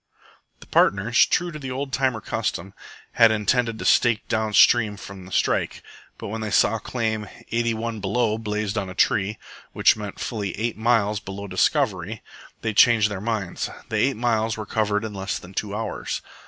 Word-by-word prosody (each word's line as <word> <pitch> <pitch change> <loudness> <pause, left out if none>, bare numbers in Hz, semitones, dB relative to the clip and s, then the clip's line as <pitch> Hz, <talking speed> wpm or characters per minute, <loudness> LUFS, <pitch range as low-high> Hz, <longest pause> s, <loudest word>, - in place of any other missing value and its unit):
The - - -12
partners, 100 +5 +3
true 175 -1 0
to 155 - -7
the 135 -2 -6
old 135 +1 -4
timer 130 -4 0
custom, 95 0 -3 0.4
had 115 -1 +6
intended 110 +2 +1
to - - -6
stake 120 -3 +3
down 110 -1 -1
stream 110 -4 +5
from 95 -2 -10
the - - -13
strike, - - 0 0.3
but - - -7
when 110 +2 -4
they 110 - -3
saw 110 +2 +3
claim 110 -4 -3 0.2
81 115 -1 -1
BELOW 110 +3 0
blazed 105 -1 -2
on 95 -2 -5
a 95 - -8
tree, 100 0 +1 0.4
which - - +4
meant 105 -2 -7
fully 105 -5 -4
eight 115 +2 -1
miles 110 -2 +1
below 100 0 -7
Discovery, 105 - 0 0.4
they 110 -1 -1
changed 110 -1 +5
their 95 -2 -4
minds. 105 -5 -2 0.2
The 110 - -1
eight 130 +3 +1
miles 110 -2 0
were 110 - -5
covered 105 0 0
in 110 - -6
less 95 0 -3
than 90 +2 -12
two 105 +1 -3
hours. 110 +1 -4
110 Hz, 180 wpm, -23 LUFS, 100-115 Hz, 0.4 s, had